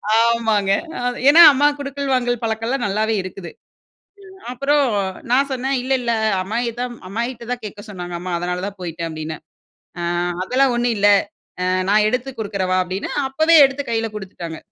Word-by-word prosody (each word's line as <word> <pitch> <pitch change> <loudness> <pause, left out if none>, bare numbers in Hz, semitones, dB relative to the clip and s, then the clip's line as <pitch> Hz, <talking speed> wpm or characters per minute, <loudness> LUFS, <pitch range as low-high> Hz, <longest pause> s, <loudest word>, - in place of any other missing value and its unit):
ஆமாங்க. 225 -3 +2 0.6
ஏன்னா 325 +4 +8
அம்மா 285 +2 +3
குடுக்கல், 280 0 -4
வாங்கல் 245 -2 0
பழக்கம்லாம் 225 +3 -1
நல்லாவே 215 +3 0
இருக்குது. 185 -2 -8 1.0
அப்றம் 280 +3 +2 0.5
நான் 275 +3 +3
சொன்னேன் 265 +1 -1
இல்லல்ல. 255 -2 0 0.3
"அம்மாயி 230 +6 -2
தான், 245 -1 -4
அம்மாயிக்கிட்ட 235 +3 -4
தான் 245 -2 -8
கேட்க 205 0 -8
சொன்னாங்க 175 -3 -6
அம்மா." 180 0 -5
அதனால 180 +1 -3
தான் 200 -1 -9
போய்ட்டேன் 170 -1 -5
அப்டின்னே. 155 0 -6 0.6
அ - - -3 0.4
அதெல்லாம் 255 +5 +2
ஒண்ணும் 240 -1 +1
இல்ல. 205 +1 +4 0.5
அ - - 0 0.3
நான் 210 +1 +4
எடுத்து 250 +2 -2
குடுத்துறவா 195 -3 -1
அப்டின்னு, 185 +2 -5 0.2
அப்பவே 315 +5 +4
எடுத்து 270 +1 -5
கையில 225 0 0
குடுத்துட்டாங்க. 175 -5 -7
225 Hz, 145 wpm, -20 LUFS, 190-255 Hz, 1.0 s, ஏன்னா